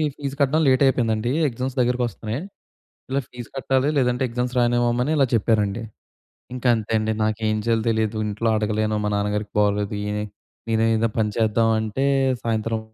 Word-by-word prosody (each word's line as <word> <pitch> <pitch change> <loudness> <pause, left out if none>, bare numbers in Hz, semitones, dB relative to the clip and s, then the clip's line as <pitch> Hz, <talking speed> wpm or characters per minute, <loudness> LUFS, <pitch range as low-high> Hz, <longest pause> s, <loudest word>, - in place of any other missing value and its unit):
Fee 140 -1 -5
కట్టడం 145 +3 +3
late 130 0 +4
అయిపోయిందండి. 120 -3 +1 0.2
Exams 130 +2 -4
దగ్గరికొస్తున్నాయి. 120 -1 -1 0.7
ఇలా 135 - +1
ఫీజు 120 -2 -9
కట్టాలి 135 +1 +1
లేదంటే 125 -1 +1
ఎగ్జామ్స్ 125 +1 -2
రాయనివ్వమని 120 +2 +2
ఇలా 140 - +4
చెప్పారండి. 110 0 +1 0.7
ఇంక 125 - -7
అంతే 110 -1 -4
అండి. 110 0 0
నాకేం 110 0 0
చేయాలో 115 -1 +1
తెలీదు 110 -1 0
ఇంట్లో 105 +3 -1
అడగలేను. 110 0 0
మా - - +1
నాన్నగారికి 105 0 -2
బాగొలేదు. 105 0 +1
ఈయనే 105 0 -2 0.5
నేనే 110 0 +2
ఏదో 115 +1 +1
పని 105 -1 +1
చేద్దాం 115 0 +2
అంటే 110 +4 -3 0.4
సాయంత్రం 115 0 -1
115 Hz, 150 wpm, -23 LUFS, 110-125 Hz, 0.7 s, late